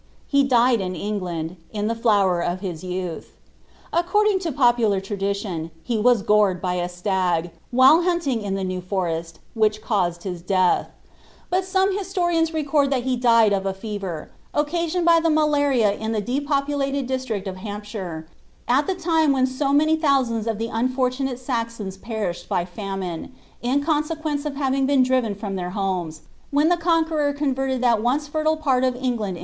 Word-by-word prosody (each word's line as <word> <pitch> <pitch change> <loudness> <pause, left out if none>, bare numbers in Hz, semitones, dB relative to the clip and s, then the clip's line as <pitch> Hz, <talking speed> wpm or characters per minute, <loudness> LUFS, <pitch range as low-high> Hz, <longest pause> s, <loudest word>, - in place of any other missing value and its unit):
* - - -34
He 280 -1 +3
died 245 -3 +3
in 185 -1 -3
England, 180 -4 -4
in 210 -1 -2
tlie 230 - -1
flower 200 -6 +2
of 175 +2 -2
his 180 -4 -5
youth. 180 -2 -5 0.6
Acrorditig 380 +2 +2
Id 305 - -3
popular 240 -6 +3
tradition, 195 -4 -3
he 235 -3 -1
was 235 -1 +3
gored 210 -3 +3
by 180 0 -1
a 175 0 -2
stag, 180 -2 -1 0.2
while 260 +7 +6
hunting 340 -9 0
in 200 -2 -2
the 195 - -2
Nes 185 -1 -3
Forest, 170 -3 -3 0.2
which 215 -1 +2
caused 180 -6 -1
his 180 -3 -5
death; 185 0 +2 0.6
bui 365 +1 +3
some 380 +1 +1
hisioriaiiB 350 -4 0
record 290 -3 +1
thai 270 -3 +1
he 255 +1 0
died 230 -3 +4
of 195 0 -1
a 190 - -2
fever, 195 -6 -6 0.2
occasioned 335 +3 0
by 335 -1 +6
the 330 0 +1
mnlaria 285 -8 +2
in 220 +1 -2
the 215 - 0
depopulated 280 +3 -1
district 250 -6 -3
of 185 -1 -5
Hamp 205 +2 -6
ehlre, 185 -7 -6 0.4
at 275 +4 +2
the 385 - 0
time 320 -4 +2
when 260 -1 +3
so 265 +2 -1
many 310 +3 +4
thousands 265 -8 +1
of 225 -2 -1
llic 230 +1 -3
unfonnnate 255 +2 -1
Saxo(t> 230 -6 -4
perished 200 -7 -4
by 175 - 0
famine, 190 +2 -5 0.3
in 265 +4 +1
consequence 305 -1 -1
of 285 - -5
having 270 -1 0
been 275 -2 +4
drivrn 250 -6 0
from 200 -2 -4
then 180 -1 -4
tiomcs, 180 -6 -2 0.3
when 295 +4 +3
tlie 350 - +2
Conqnernr 320 -4 +1
converted 270 -3 -1
that 235 -4 +3
once 270 +6 0
fertile 310 +1 0
pan 265 -5 +1
of 255 -1 +1
F.ni^lani! 235 -8 -2
240 Hz, 175 wpm, -23 LUFS, 195-285 Hz, 0.6 s, while